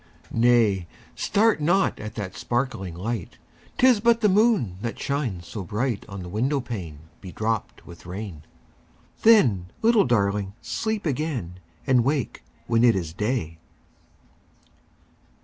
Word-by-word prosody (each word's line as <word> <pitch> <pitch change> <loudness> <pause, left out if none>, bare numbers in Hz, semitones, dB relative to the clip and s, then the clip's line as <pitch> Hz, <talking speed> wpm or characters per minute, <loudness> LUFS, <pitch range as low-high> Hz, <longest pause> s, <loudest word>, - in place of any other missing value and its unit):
10 115 - -1
Nay! 110 -7 +3 0.3
start 210 -5 +2
not 175 +6 +2
at 110 0 -7
that 100 -4 -5
sparkling 120 -8 -2
light; 110 +6 -4 0.4
'Tis 255 -4 +5
but 230 +1 +3
the 210 - +4
moon 195 - +2
that 115 0 -4
shines 125 - -2
so 95 +4 -6
bright 110 +4 -2
On 100 -2 -7
the - - -8
window 125 +10 0
pane 90 - -6 0.2
bedropped 110 +3 -3
with 85 0 -13
rain: 95 -4 -6 0.8
Then, 125 - +5 0.2
little 225 -2 +5
Darling! 100 -4 0
sleep 210 - -3
again, 130 - -3 0.3
And 125 -3 +4
wake 135 -2 -1 0.2
when 115 0 +2
it 120 -2 +6
is 85 -4 -3
day. 105 -5 -2
115 Hz, 130 wpm, -24 LUFS, 95-145 Hz, 0.8 s, it